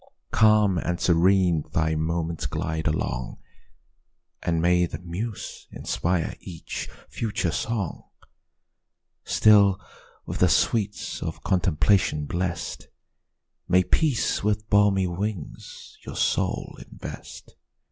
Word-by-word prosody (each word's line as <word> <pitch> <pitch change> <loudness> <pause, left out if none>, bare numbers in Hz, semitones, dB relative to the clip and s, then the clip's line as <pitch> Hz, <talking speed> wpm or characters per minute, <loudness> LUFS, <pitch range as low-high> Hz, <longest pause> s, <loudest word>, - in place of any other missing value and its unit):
Calm 105 -4 +4
and 90 +1 -2
serene 90 -2 +3
thy 80 -1 +1
moments 80 +1 -2
glide 80 0 -3
along, 65 -5 -2 1.0
And 85 -1 0
may 90 +1 +3
the 75 - -6
muse 90 +6 -6
inspire 90 -1 -1
each 85 -4 -7 0.2
future 105 -6 -2
song! 100 +1 -3 1.2
Still, 100 -2 +5 0.5
with - - -5
the - - +5
sweets 105 -3 0
of - - -5
contemplation 90 -3 +2
bless'd, 85 +3 -3 0.8
May 90 +1 +4
peace 140 - +1
with 105 +1 0
balmy 105 -2 +4
wings 90 -1 -6
your - - -8
soul - - -1
invest! - - -10
90 Hz, 100 wpm, -25 LUFS, 80-105 Hz, 1.2 s, Still